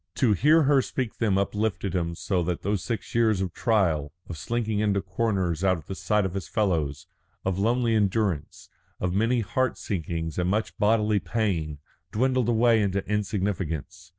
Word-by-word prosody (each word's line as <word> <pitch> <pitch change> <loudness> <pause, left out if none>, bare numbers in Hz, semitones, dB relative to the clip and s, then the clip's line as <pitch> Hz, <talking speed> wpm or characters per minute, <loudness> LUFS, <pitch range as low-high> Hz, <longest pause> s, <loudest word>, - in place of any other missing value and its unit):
To 120 -5 +3
hear 150 - +4
her 140 -1 +4
speak 125 -3 -4
them 105 -4 +2
uplifted 100 -1 -1
him 85 -2 -1
so 90 +1 -1
that 90 -1 -3
those 100 -1 -1
six 115 -5 -4
years 110 -4 +3
of 95 -2 -2
trial, 85 -10 +1 0.2
of 85 - -6
slinking 110 +5 -2
into 105 -2 +2
corners 95 -4 -1
out 95 -2 +3
of 80 - -12
the - - -5
sight 105 +1 +1
of 95 - -3
his 95 -4 -4
fellows, 80 -9 -1 0.4
of 95 0 0
lonely 115 +2 +2
endurance, 100 -6 0 0.3
of 90 -1 -1
many 115 +5 +2
heart 120 +4 0
sinkings 80 -3 -3
and 90 0 +1
much 110 +3 -1
bodily 105 -1 +3
pain, 90 -10 -1 0.3
dwindled 125 +1 +1
away 115 -1 +4
into 100 -1 0
insignificance. 95 -5 -2
100 Hz, 170 wpm, -26 LUFS, 90-110 Hz, 0.4 s, hear